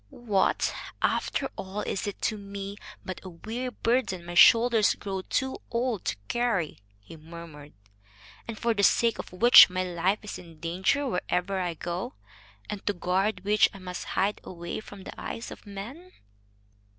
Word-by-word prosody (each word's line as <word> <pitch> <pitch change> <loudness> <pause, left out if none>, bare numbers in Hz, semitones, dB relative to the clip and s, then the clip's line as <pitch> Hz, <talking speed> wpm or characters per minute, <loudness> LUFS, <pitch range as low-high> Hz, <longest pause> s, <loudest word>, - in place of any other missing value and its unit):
"What, 210 - +1 0.3
after - - +1
all, 195 +2 -4
is 195 - -3
it 205 - -5
to 220 - +1
me 200 0 -7 0.3
but 185 - -6
a 185 - -7
weary 225 +9 -5
burden 230 -7 0
my 175 - -6
shoulders 230 +3 +6
grow 195 -2 -4
too 265 +7 -1
old 235 -4 -1
to - - 0
carry," 235 -10 0 0.2
he 100 +10 -13
murmured, 160 -2 -11 0.7
"and 230 -2 -5
for 235 0 +1
the 205 - 0
sake 230 +3 +3
of - - -6
which 230 +6 +9
my 185 0 -1
life 180 +2 0
is 210 - -6
in 165 -3 -14
danger 185 - 0
wherever 190 -2 -1
I 175 -2 -2
go, 175 - -4 0.5
and 205 -2 -5
to 205 - +2
guard 185 +2 0
which 210 +1 +4
I - - -7
must 180 -1 -6
hide 200 +2 +1
away 170 -1 -6
from 205 -2 -11
the - - -8
eyes 230 - -5
of - - -11
men?" 240 - -8
195 Hz, 165 wpm, -28 LUFS, 180-225 Hz, 0.7 s, which